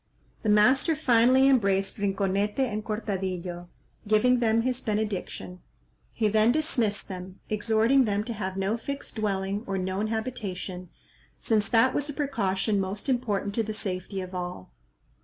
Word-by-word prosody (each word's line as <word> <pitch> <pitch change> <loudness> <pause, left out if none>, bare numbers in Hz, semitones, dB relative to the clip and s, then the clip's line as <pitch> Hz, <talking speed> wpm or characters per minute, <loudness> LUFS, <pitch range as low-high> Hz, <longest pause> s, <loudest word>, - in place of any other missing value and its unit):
The 220 - -1
master 260 +10 +4
finally 255 -1 +4
embraced 195 -7 +2
Rinconete 200 +1 0
and 230 -6 0
Cortadillo, 185 -5 -4 0.4
giving 240 +4 +4
them 230 -1 +2
his 255 0 -1
benediction; 205 -4 -3 0.5
he 220 - 0
then 215 +2 +4
dismissed 240 -8 0
them, 185 0 -8
exhorting 225 +5 +3
them 205 -1 0
to 235 - -4
have 190 -3 -4
no 195 +4 0
fixed 280 0 -6
dwelling 200 -1 -1
or 195 -1 -1
known 190 +3 -1
habitation, 205 -6 -4 0.5
since 215 -3 +1
that 235 +2 +4
was 290 +1 -1
a - - -3
precaution 205 -8 0
most 195 +6 -3
important 210 -6 0
to 225 - +1
the 215 -1 -4
safety 190 -1 -4
of 185 0 -8
all. 180 - -5
210 Hz, 145 wpm, -27 LUFS, 195-235 Hz, 0.5 s, master